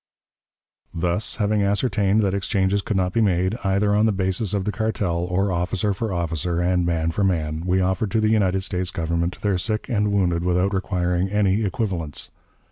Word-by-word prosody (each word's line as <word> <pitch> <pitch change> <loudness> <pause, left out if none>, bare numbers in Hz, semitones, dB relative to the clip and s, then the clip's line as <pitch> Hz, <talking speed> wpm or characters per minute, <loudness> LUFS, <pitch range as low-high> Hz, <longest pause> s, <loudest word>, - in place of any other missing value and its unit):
Thus, 90 +5 0
having 105 -2 +1
ascertained 100 0 +1
that 100 -2 +1
exchanges 100 0 0
could 100 0 -2
not 90 -1 0
be 115 - +2
made, 95 0 +1
either 100 +1 +2
on 105 +2 +3
the - - +3
basis 95 +1 0
of 100 -2 -1
the 105 - 0
cartel, 105 -5 -1
or 95 +2 0
officer 90 +3 0
for 110 +2 -3
officer 85 0 -1
and 90 0 +1
man 85 -1 0
for 100 +5 -1
man, 80 -4 0
we 95 +1 +2
offered 95 +3 0
to 110 - +1
the 110 0 +2
United 95 -3 +2
States 90 -1 -1
Government 85 +1 -2
their 100 -4 0
sick 110 +5 -2
and 105 -4 +1
wounded 90 -4 +1
without 90 +2 +1
requiring 90 -1 0
any 105 0 +2
equivalents. 90 - -3
95 Hz, 185 wpm, -23 LUFS, 90-105 Hz, -, on